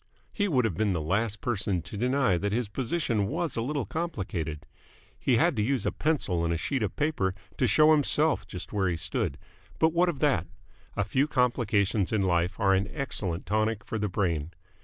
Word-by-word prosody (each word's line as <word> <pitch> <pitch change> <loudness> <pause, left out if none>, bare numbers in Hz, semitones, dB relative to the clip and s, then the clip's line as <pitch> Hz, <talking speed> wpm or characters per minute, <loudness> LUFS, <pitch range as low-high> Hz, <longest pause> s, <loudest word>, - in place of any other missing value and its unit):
He 205 -1 0
would 130 - +2
have 110 - 0
been 100 +3 +1
the 85 - -1
last 100 +7 -1
person 100 -7 -1
to 105 - -9
deny 125 -2 +2
that 100 +4 -1
his 115 +1 0
position 115 -3 -1
was 165 - -2
a 115 - -1
little 140 +1 -2
complicated 95 - -4 0.5
he - - +2
had - - +3
to - - +2
use 125 0 0
a - - +1
pencil 120 - 0
and 85 - 0
a 85 - +1
sheet 135 - -2
of 105 - -2
paper 140 -12 0 0.2
to 130 - +3
show 155 +8 +5
himself 150 +1 +2
just 90 +3 -7
where 95 -3 +1
he 85 - -1
stood 70 -3 -2 0.4
but 160 0 +3
what 175 +1 +3
of 165 - -3
that? 135 - +1 0.5
A 105 - +2
few 130 +8 +1
complications 110 - +1
in 105 -3 +1
life 90 +1 +1
are 100 -3 +4
an 95 +2 +1
excellent 100 - -2
tonic 110 +1 0
for 110 - -4
the 105 0 -1
brain. 85 -6 -1
110 Hz, 200 wpm, -28 LUFS, 95-140 Hz, 0.5 s, show